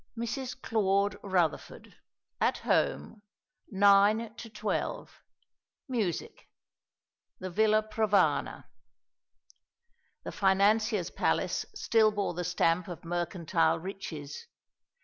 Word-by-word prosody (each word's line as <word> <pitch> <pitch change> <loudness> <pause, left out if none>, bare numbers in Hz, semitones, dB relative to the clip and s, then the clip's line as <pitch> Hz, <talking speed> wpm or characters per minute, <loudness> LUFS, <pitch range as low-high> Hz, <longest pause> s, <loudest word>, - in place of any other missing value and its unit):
"Mrs. 250 +3 -4
Claude 200 -4 +1
Rutherford, 180 -5 -2 0.5
at - - +1
home, 215 - -1 0.5
9 205 +2 +4
to 225 0 -10
12. 215 -1 -4 0.7
Music. 220 - -3 0.9
"The 185 0 -6
Villa 215 +3 +3
Provana." 210 -7 +1 1.6
The - - -6
financier's 200 0 +2
palace - - -1
still 220 -2 +3
bore 205 -3 -2
the 180 +1 -4
stamp 170 0 +1
of 175 -2 -9
mercantile 175 -1 0
riches. 160 -5 -7
200 Hz, 90 wpm, -29 LUFS, 175-215 Hz, 1.6 s, 9